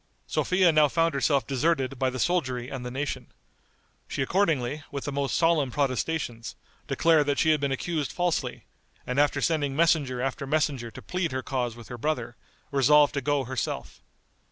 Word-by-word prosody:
Sophia 185 -2 +2
now 155 -1 +5
found 165 +2 +1
herself 140 0 +1
deserted 135 -2 0
by 130 - +2
the 130 - -5
soldiery 130 -6 0
and 135 -2 -6
the 125 - -4
nation. 135 +3 -4 0.8
She 135 - -2
accordingly, 150 -5 0
with 140 -1 -5
the 145 - -2
most 140 -1 -1
solemn 165 -5 +3
protestations, 130 -2 -2 0.3
declared 160 -3 +3
that 145 -1 +1
she 160 - +4
had 155 - +2
been 140 -1 0
accused 150 +2 -2
falsely, 175 -2 -2 0.4
and 125 +2 -1
after 145 0 +2
sending 145 -4 0
messenger 150 -5 +2
after 135 +2 -3
messenger 140 -5 0
to - - -11
plead 180 -2 -2
her 130 0 -3
cause 125 -4 -2
with 120 -2 -12
her 120 - -7
brother, 125 -4 -2 0.4
resolved 145 +1 +5
to 140 - -1
go 145 0 +1
herself. 120 - -4
140 Hz, 175 wpm, -27 LUFS, 130-155 Hz, 0.8 s, now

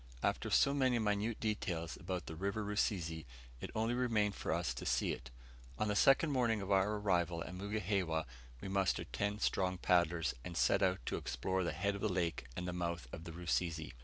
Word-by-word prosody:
After - - 0
so 140 - +4
many 130 -3 +3
minute 105 0 0
details 90 -7 -2
about 90 0 -4
the 80 - -6
River 100 +5 -2
Rusizi, 90 -6 -1 0.4
it - - -5
only 110 +2 +1
remained 115 -5 +2
for - - -3
us - - 0
to 60 - -6
see - - +1
it. - - -6 0.5
On 110 - 0
the 105 - +1
second 135 +7 +5
morning 120 -5 +2
of 100 0 -4
our 100 +2 +3
arrival 90 -5 +1
at 90 - -8
Mugihewa 95 -4 -1 0.4
we - - -5
mustered 95 -2 0
ten 100 +1 0
strong 95 -3 +1
paddlers, 85 -3 +2
and 85 -1 -6
set - - +3
out 95 -9 +1
to - - -1
explore 95 +10 -1
the 85 - 0
head 100 +6 0
of 100 - -6
the 110 - +1
lake 85 -8 -1
and 90 - -3
the 90 - -2
mouth 85 -5 -3
of 80 - -7
the 85 - -6
Rusizi. 85 -2 -1
95 Hz, 200 wpm, -36 LUFS, 85-105 Hz, 0.5 s, second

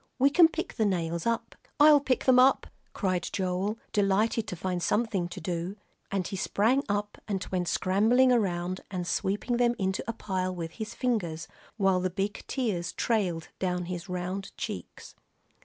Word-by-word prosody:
"We 275 +2 +4
can 335 +3 +7
pick 330 +2 -5
the 220 - +2
nails 170 -1 -1
up." 230 0 -1 0.3
"I'll 295 0 +8
pick 270 -2 -1
'em 255 -1 +7
up," 260 +2 +5 0.3
cried 185 -4 -1
Joel, 190 +3 -1 0.2
delighted 210 +2 +2
to - - -4
find 180 0 -2
something 205 -3 0
to 175 - -8
do, 175 +2 -3 0.4
and 195 -3 -1
he - - -5
sprang 225 +8 +2
up 205 0 -2
and 200 -2 -2
went 180 -2 -1
scrambling 225 +10 +3
around 185 -5 0
and 180 -2 -3
sweeping 205 +7 -1
them 240 0 +3
into 190 -1 -1
a 230 - -1
pile 185 -4 -2
with 165 -2 -5
his 220 +4 -7
fingers, 185 -11 -1 0.3
while 195 -3 +3
the 185 0 0
big 195 +3 -3
tears 210 -10 -2
trailed 185 -8 0
down 180 -1 -1
his 175 +1 -6
round 180 +2 -4
cheeks. - - -6
195 Hz, 170 wpm, -28 LUFS, 180-230 Hz, 0.4 s, I'll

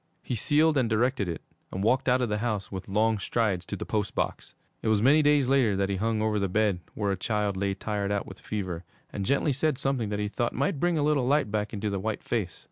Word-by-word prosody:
He - - -4
sealed 150 +5 +3
and 120 -3 +1
directed 115 -3 +1
it 85 - -5 0.3
and 95 - -3
walked 125 +4 +2
out 125 +1 +3
of 120 - 0
the 105 0 -1
house, 105 -4 -2
with 95 -1 -6
long 110 +2 +2
strides, 100 -4 0
to - - -4
the - - -5
post 105 -2 -2
box. - - -3 0.3
It - - -3
was 110 -1 +3
many 140 +8 +5
days 145 -3 +4
later 130 -6 +3
that 100 0 0
he 100 - -1
hung 110 +2 0
over 110 -1 +1
the 100 -1 0
bed 105 -2 +1 0.2
where 100 -2 0
a - - +1
child 105 +1 -1
lay 100 0 -1
tired 100 0 -2
out 100 -1 -1
with 95 - -11
fever, 95 -5 -4 0.3
and 100 -2 -3
gently 140 +1 +2
said 145 +1 0
something 130 -6 -1
that 105 - -2
he 105 0 -1
thought 120 +3 -2
might 140 +2 0
bring 175 +1 +2
a 145 - +1
little 145 -4 +2
light 140 -6 +2
back 105 0 -1
into 105 -1 -3
the 100 - -1
white 110 +2 -3
face. 105 -7 -2
110 Hz, 255 wpm, -27 LUFS, 100-130 Hz, 0.3 s, many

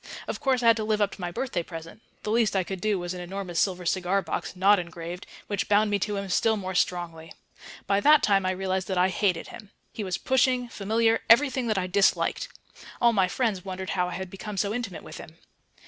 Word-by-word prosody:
Of - - -4
course 260 -3 +1
I - - +1
had 230 -1 +6
to 220 - -2
live 215 0 0
up 205 -1 +2
to - - -10
my 175 - -2
birthday 180 0 -2
present; 165 +3 -9 0.2
the 210 - -2
least 225 -3 +2
I 190 - +2
could 190 0 -6
do 215 -2 +1
was 175 0 -4
an 180 - -6
enormous 180 -1 -4
silver 180 -2 0
cigar 185 +2 +1
box - - -4
(not 195 +2 +5
engraved), 170 +1 -7 0.2
which 205 -1 -3
bound 210 +1 +3
me 205 - +1
to 210 +2 -2
him 195 0 -4
still 220 +4 +2
more 190 -2 -4
strongly. 170 -3 -2 0.5
By 200 0 +2
that 300 +6 +6
time 195 -2 +3
I 185 - 0
realized 190 0 -2
that 190 - -2
I 180 +1 +4
hated 185 -3 0
him. 210 - -11 0.2
He 215 - -4
was 185 -2 -2
pushing, 255 -1 +1
familiar, 225 +2 +1
everything 260 0 +4
that 215 -3 0
I 185 - 0
disliked. 195 +2 +1 0.5
All 235 -1 +4
my 190 -4 +3
friends 200 -2 -1
wondered 190 -1 -5
how 180 -2 0
I - - -6
had 190 -1 -6
become 200 +1 -7
so 200 +2 0
intimate 225 -7 -5
with - - -9
him.... 160 +1 -12
195 Hz, 230 wpm, -26 LUFS, 180-215 Hz, 0.5 s, had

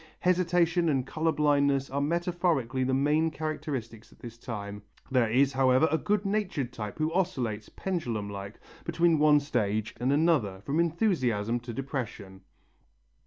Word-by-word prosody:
Hesitation 175 -1 +2
and 135 -4 +1
colour 160 +3 0
blindness 140 -3 +2
are 140 +1 -1
metaphorically 170 -5 0
the 130 - 0
main 150 +4 +2
characteristics 145 -8 -5
at - - -19
this 120 -1 -10
time. 105 -4 -6 0.3
There 125 -4 +3
is, 135 +4 +3
however, 130 +3 +4
a 160 - +2
good 205 0 0
natured 185 - -1
type 105 -2 -6
who 155 +1 -1
oscillates, 125 - -1
pendulum 120 - -3
like, 100 +1 -7 0.2
between 170 -2 +2
one 150 -1 +6
stage 110 -7 -1
and 125 +3 +1
another, 140 - +2
from 140 +9 -1
enthusiasm 130 - +1
to 120 0 -8
depression. 115 -7 -5
140 Hz, 145 wpm, -28 LUFS, 115-165 Hz, 0.3 s, one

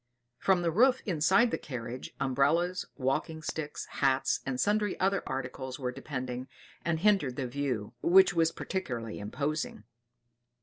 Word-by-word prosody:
From 185 -2 +3
the 170 - +2
roof 250 +8 +4
inside 190 +6 +3
the - - -1
carriage, 125 -1 -6
umbrellas, 160 +7 +1
walking 155 +4 -1
sticks, 155 -1 -4
hats, 135 -1 +1
and 130 -2 -2
sundry 210 +1 +1
other 195 +1 +2
articles 130 0 -4
were 125 -3 -2
depending, 130 -1 -5 0.4
and 165 -1 0
hindered 195 -11 +3
the 135 - -2
view, 125 -4 -2
which 190 +1 +6
was 165 -1 +3
particularly 125 - -4
imposing. 140 +3 -3
145 Hz, 135 wpm, -30 LUFS, 130-180 Hz, 0.4 s, which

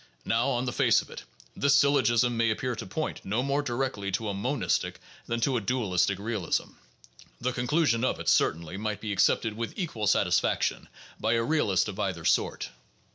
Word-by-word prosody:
Now, 115 +4 +1
on 125 -1 0
the 125 - -2
face - - +3
of - - -16
it, - - -9 0.3
this 140 0 +3
syl 140 0 +5
logism 120 -3 +3
may 115 -1 +1
appear 125 +3 -1
to - - -7
point 155 +11 -4
no 110 +6 -1
more 140 +1 +1
directly 120 -7 -2
to 105 +2 -1
a - - -2
monistic 125 +7 -1 0.3
than 115 0 -1
to 130 +1 +2
a - - -1
dualistic 100 -4 0
realism; 100 -4 -2 0.7
the 125 +1 -1
conclusion 125 -2 +1
of 130 - 0
it, - - -7
certainly, 85 +3 +1
might 105 0 -3
be 110 - -4
accepted 105 +3 +2
with 115 +1 -5
equal 135 - -2
satisfaction - - +1 0.3
by 110 +1 +1
a 115 0 +2
realist 115 - +1
of 105 -1 -6
either 95 -5 -2
sort. - - +1
115 Hz, 185 wpm, -28 LUFS, 105-130 Hz, 0.7 s, syl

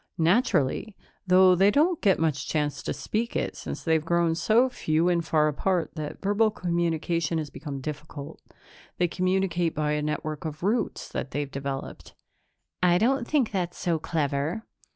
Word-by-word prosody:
"Naturally, 175 - +2 0.3
though 185 0 +6
they 190 +3 +5
don't 315 - +2
get 195 -3 +4
much 155 -4 -1
chance 150 -2 -1
to - - -3
speak 230 +2 -3
it, - - -1
since - - -6
they've 160 -2 +2
grown 170 0 +2
so 220 +9 +3
few 165 -8 0
and 170 -1 +1
far 155 -1 +2
apart 165 +2 0
that 155 -2 -6
verbal 205 +3 +3
communication 170 -3 -1
has 155 -2 -4
become 140 -4 -6
difficult. 150 0 -7 0.6
They 175 - +2
communicate 180 -2 0
by 150 0 0
a 150 0 0
network 150 0 -3
of 155 0 -6
roots 220 +5 0
that 135 - -4
they've 140 +1 -3
developed." 140 0 -6 0.7
"I 175 -1 +4
don't 240 +4 +1
think 280 -7 +1
that's 180 -3 -2
so 170 -2 0
clever." 150 +5 -1
170 Hz, 160 wpm, -26 LUFS, 150-190 Hz, 0.7 s, though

